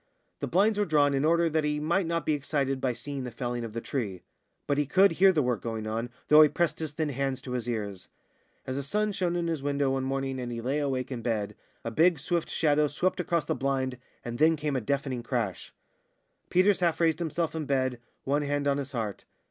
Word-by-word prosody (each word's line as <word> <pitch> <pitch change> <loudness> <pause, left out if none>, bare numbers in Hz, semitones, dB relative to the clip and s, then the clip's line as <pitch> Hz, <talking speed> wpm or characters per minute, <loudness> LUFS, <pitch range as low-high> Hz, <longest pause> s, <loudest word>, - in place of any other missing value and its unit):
The - - -2
blinds 205 +4 +3
were 205 - +3
drawn 145 -4 +3
in 135 0 +1
order 170 +2 +3
that 160 -1 +1
he 150 0 0
might 170 +4 +1
not 165 -1 -1
be 155 - +2
excited 140 -2 -1
by 130 - +1
seeing 140 +2 -5
the 125 - -4
felling 120 0 -3
of 115 -2 -6
the 115 - -3
tree; 105 -11 -4 0.4
but 145 0 +1
he 145 - +1
could 190 +5 +5
hear 190 +4 +5
the 155 -5 +1
work 125 -5 0
going 110 -2 -4
on, 115 +2 -2 0.2
though 150 +1 +8
he 155 - +7
pressed 165 +3 0
his 160 -2 -3
thin 155 0 -2
hands 135 -1 -2
to 130 - -7
his 125 -1 -2
ears. 100 -5 -4 0.6
As 130 +1 -3
the - - -1
sun 210 +9 0
shone 180 -3 -1
in 170 -1 -1
at - - 0
his 160 -4 -2
window 140 -1 0
one 135 0 -1
morning, 135 0 -2
and 120 -1 -4
he 115 - -4
lay 130 +5 -1
awake 135 -2 -2
in 125 -3 -4
bed, 110 -3 -2 0.3
a 115 - -3
big, 165 +7 +4
swift 170 +3 -1
shadow 150 -1 +2
swept 180 +7 -1
across 170 -3 0
the - - 0
blind, 130 -2 -1 0.3
and 120 0 -5
then 160 +1 +5
came 150 -2 -2
a 130 - 0
deafening 135 +1 -1
crash. 115 -6 -3 0.8
Peters 190 +2 +4
half 170 -3 +1
raised 165 -1 +2
himself 170 -1 -1
in 160 -2 -3
bed, 130 -3 0 0.2
one 145 +2 +1
hand 145 0 -1
on 140 0 +2
his 140 0 -5
heart. 110 -5 -4
140 Hz, 235 wpm, -28 LUFS, 125-160 Hz, 0.8 s, though